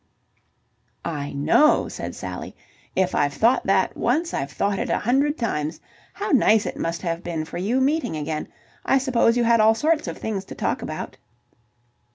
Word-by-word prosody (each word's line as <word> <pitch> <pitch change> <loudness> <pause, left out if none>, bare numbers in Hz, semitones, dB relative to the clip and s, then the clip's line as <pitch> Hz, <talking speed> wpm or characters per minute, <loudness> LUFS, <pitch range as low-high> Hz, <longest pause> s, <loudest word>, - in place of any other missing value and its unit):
"I 145 -4 -3
know," 145 - +3
said - - -6
Sally. - - -7 0.4
"If 185 -1 +1
I've 145 -1 +1
thought 235 - +2
that 190 -1 +2
once, 320 +8 0
I've 135 - -2
thought 200 +5 -1
it - - -2
a - - +2
hundred 275 +6 +1
times. 155 - -2 0.4
How 410 +1 -3
nice 220 -6 +4
it - - -4
must 165 +1 -3
have 170 -1 -2
been 165 -2 -3
for 165 - -6
you 220 +8 +1
meeting 280 - +1
again. 155 +1 -3 0.4
I 270 - +3
suppose 245 -3 +2
you 240 - +3
had 230 0 +4
all 220 +1 +5
sorts 310 +4 +1
of - - -5
things 205 -3 -3
to - - -9
talk - - -1
about?" - - -6
220 Hz, 180 wpm, -23 LUFS, 165-260 Hz, 0.4 s, all